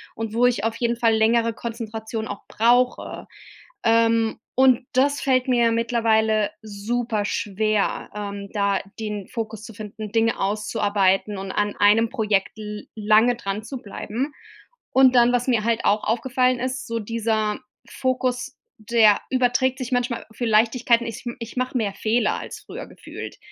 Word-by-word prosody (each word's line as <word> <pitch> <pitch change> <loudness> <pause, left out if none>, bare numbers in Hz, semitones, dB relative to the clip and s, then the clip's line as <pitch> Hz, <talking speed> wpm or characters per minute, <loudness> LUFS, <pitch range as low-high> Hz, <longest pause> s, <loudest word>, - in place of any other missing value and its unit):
und 225 -1 -4
wo 240 +2 +3
ich 240 -4 +2
auf 225 0 0
jeden 235 -1 0
Fall 230 -2 +3
längere 230 +1 +3
Konzentration 225 -1 -5
auch 205 - -6
brauche. 245 +3 +1 0.6
Ähm, 230 -1 +3 0.2
und 260 -1 +4
das 280 +3 +2
fällt 255 -1 +2
mir 240 -2 +3
mittlerweile 220 -2 +2
super 215 +1 -2
schwer, 210 +1 -1
ähm, 200 -1 -5
da 200 -1 +1 0.2
den 210 -3 -4
Fokus 220 -2 -5
zu 225 - -10
finden, 210 0 -7
Dinge 225 +1 +1
auszuarbeiten 205 -1 +1
und 190 0 -5
an 205 0 -1
einem 215 +3 +4
Projekt 215 -4 0
l 210 -1 -7
lange 215 +3 +4
dran 200 -3 -4
zu 265 +3 -6
bleiben. 240 +6 -5 0.6
Und 260 -1 +5
dann, 240 0 +6
was 245 0 0
mir 235 -4 +2
halt 230 -1 0
auch 210 +1 +2
aufgefallen 250 +2 +1
ist, 260 +2 -3
so 230 - -2
dieser 220 0 -1 0.3
Fokus, 255 +1 -2 0.2
der 215 -1 +4
überträgt 255 0 +1
sich 255 0 -5
manchmal 245 -1 -1
für 240 - -3
Leichtigkeiten. 235 +2 +3
Ich 230 +2 -7
m 240 - -5
ich 230 0 -8
mache 255 0 -1
mehr 205 -4 -1
Fehler 220 +2 +1
als - - -8
früher - - -8
gefühlt. - - -9
225 Hz, 155 wpm, -23 LUFS, 215-245 Hz, 0.6 s, dann